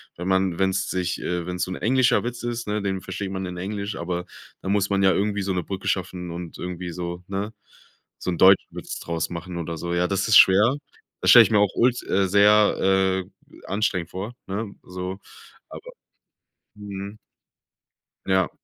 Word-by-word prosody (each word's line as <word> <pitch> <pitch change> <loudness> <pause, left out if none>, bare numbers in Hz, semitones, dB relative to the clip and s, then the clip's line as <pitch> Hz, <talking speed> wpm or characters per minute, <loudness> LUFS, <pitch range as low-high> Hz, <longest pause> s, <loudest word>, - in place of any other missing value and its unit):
wenn 90 - -6
man 95 -2 +1
wenn's 95 0 0
sich 90 -1 -2
äh, 90 -1 -2
wenn's 90 0 -3
so 95 - -7
'n - - -3
englischer 125 +1 +2
Witz 120 0 -5
ist, 120 0 -3
ne, 105 0 -2
den 95 -2 -2
versteht 95 -2 -5
man 95 -1 -3
in 90 0 -6
Englisch, 100 +2 -4
aber 90 +1 -3 0.4
dann 95 - -2
muss 100 -1 +1
man 100 -1 +1
ja 95 - +6
irgendwie 100 +1 0
so 95 0 -2
'ne 90 - -1
Brücke 95 +3 -6
schaffen 90 -2 -3
und 85 -1 -7
irgendwie 90 0 -5
so, 85 0 -5
ne 100 +2 -3 0.7
so - - -4
'n 85 - -3
deutschen 95 +2 +6
Witz - - -6
draus 85 -1 -3
machen 85 +1 -6
oder 85 -1 -4
so. 85 +2 -4
Ja, 90 +1 +1
das 95 +1 -1
ist 105 - +8
schwer. 105 +7 +6 0.5
Das - - +2
stelle - - +10
ich - - -2
mir 105 - +4
auch 100 -2 +2
ult 125 0 +2
äh, 95 0 +2
sehr, 95 -2 +4 0.3
äh, - - -17
anstrengend 95 -4 -1
vor, 100 +6 -5
ne, 100 +1 -4
so. 90 +1 -6 0.5
Aber - - -10 0.9
mhm. 100 0 -7 1.1
Ja. 95 -2 +2
95 Hz, 190 wpm, -24 LUFS, 90-100 Hz, 1.1 s, stelle